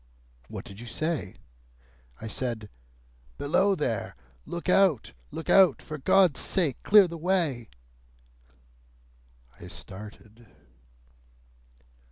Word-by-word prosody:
"What - - -8
did 100 +1 -11
you 120 - -9
say?" 155 - -3 0.8
"I - - -8
said, 110 -1 -4 0.7
'Below 195 +7 +2
there! 120 - -2 0.3
Look 170 +1 -6
out! 185 - +3 0.2
Look 160 - -7
out! 190 -7 +5
For 155 -1 -8
God's 185 +1 +4
sake, 160 -10 0
clear 205 -2 +6
the 170 -1 -8
way!'" 160 - 0 1.9
I - - -10
started. 105 +3 -11
150 Hz, 100 wpm, -27 LUFS, 115-180 Hz, 1.9 s, clear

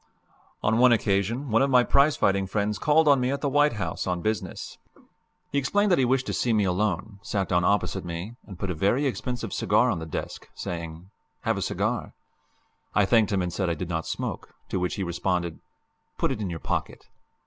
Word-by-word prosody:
On 110 +2 +2
one 125 0 +7
occasion 115 +4 +1
one 115 - +4
of 135 - +3
my 125 -2 +5
prize 140 +4 +4
fighting 95 -1 +2
friends 105 +1 -1
called 150 +1 +4
on 140 -2 +6
me 125 0 +1
at 140 0 -2
the 145 - 0
White 145 0 +3
House 95 -7 -3
on 90 -1 -1
business. 110 -2 -3 0.7
He 140 - +2
explained 205 +9 +1
that 175 - +4
he 130 - +4
wished 130 +1 +1
to - - -3
see 120 - +1
me 105 -2 +3
alone, 100 +2 -1
sat 100 -1 -2
down 90 -1 +2
opposite 100 0 +1
me, 85 +6 -6
and 95 -4 -9
put 95 +1 -3
a - - -1
very 100 - +1
expensive 125 -2 -3
cigar - - +3
on - - -2
the 80 - -6
desk, 80 - -6
saying, 85 +2 -6 0.3
"Have - - 0
a - - -4
cigar." - - -2 0.8
I 105 - +5
thanked 110 0 +3
him 95 -2 +1
and 90 -1 -3
said 95 -1 -1
I 85 - 0
did 85 +2 -5
not 80 -2 -2
smoke, - - -5
to 95 - -1
which 90 0 -1
he 100 - -2
responded, 85 -1 -2 0.6
"Put - - +1
it - - -3
in 100 - -2
your 85 - -4
pocket." - - -3
100 Hz, 215 wpm, -26 LUFS, 90-125 Hz, 0.8 s, one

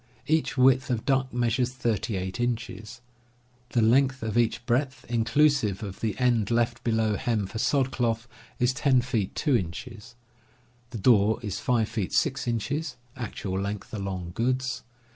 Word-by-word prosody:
Each 155 -2 +1
width 130 0 +4
of 120 -3 -1
duck 135 -1 +1
measures 120 +1 0
38 110 -5 -2
inches. 115 -1 -3 0.7
The 120 -2 +2
length 130 +2 +3
of 110 -1 -2
each 120 0 +1
breadth, 130 +2 0
inclusive 120 -2 +2
of 95 -2 -6
the 110 -2 -2
end 120 -5 +2
left 120 0 0
below 110 -3 +1
hem 115 -6 0
for 110 +4 -6
sod 135 +1 +2
cloth, 115 -2 -1 0.3
is 125 +1 +2
10 130 0 +3
feet 115 -6 -2
2 145 -4 +2
inches. 115 +4 -5 0.7
The 120 - -6
door 110 0 +4
is 105 -3 -3
5 115 -3 +1
feet 110 -4 -3
6 135 -6 +1
inches 135 +5 -2 0.2
(actual 100 -6 -4
length 100 +1 -4
along 95 -4 -4
goods) 130 +2 -1
120 Hz, 150 wpm, -27 LUFS, 110-130 Hz, 0.7 s, width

